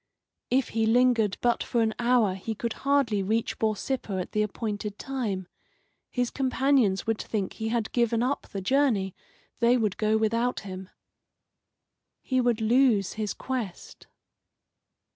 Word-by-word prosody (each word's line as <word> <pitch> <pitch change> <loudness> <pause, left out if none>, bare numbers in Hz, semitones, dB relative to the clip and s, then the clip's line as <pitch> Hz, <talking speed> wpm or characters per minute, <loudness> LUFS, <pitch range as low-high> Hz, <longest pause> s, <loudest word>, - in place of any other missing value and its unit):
If 260 0 +2
he 225 0 0
lingered 235 -3 +3
but 240 -1 +2
for 235 -1 +1
an 220 -1 0
hour 240 -5 +3
he 205 +4 -5
could 230 +2 -3
hardly 275 -7 +2
reach 220 +4 -1
Borsippa 220 +1 -1
at 180 - -5
the 210 - +1
appointed 210 -1 -3
time. 220 -9 -3 0.6
His 245 -1 -1
companions 260 -6 +2
would 225 -1 -1
think 205 -4 -3
he 220 - -4
had 230 -2 -1
given 235 -1 +1
up 275 +3 -1
the 195 - -5
journey. 215 -5 +2 0.5
They 240 +1 +4
would 215 -5 0
go 215 0 +2
without 230 +3 0
him. 190 -1 -8 1.3
He 255 -1 +1
would 240 -2 +1
lose 225 -4 +3
his 215 -2 -3
quest. 245 -9 -5
225 Hz, 145 wpm, -27 LUFS, 210-250 Hz, 1.3 s, They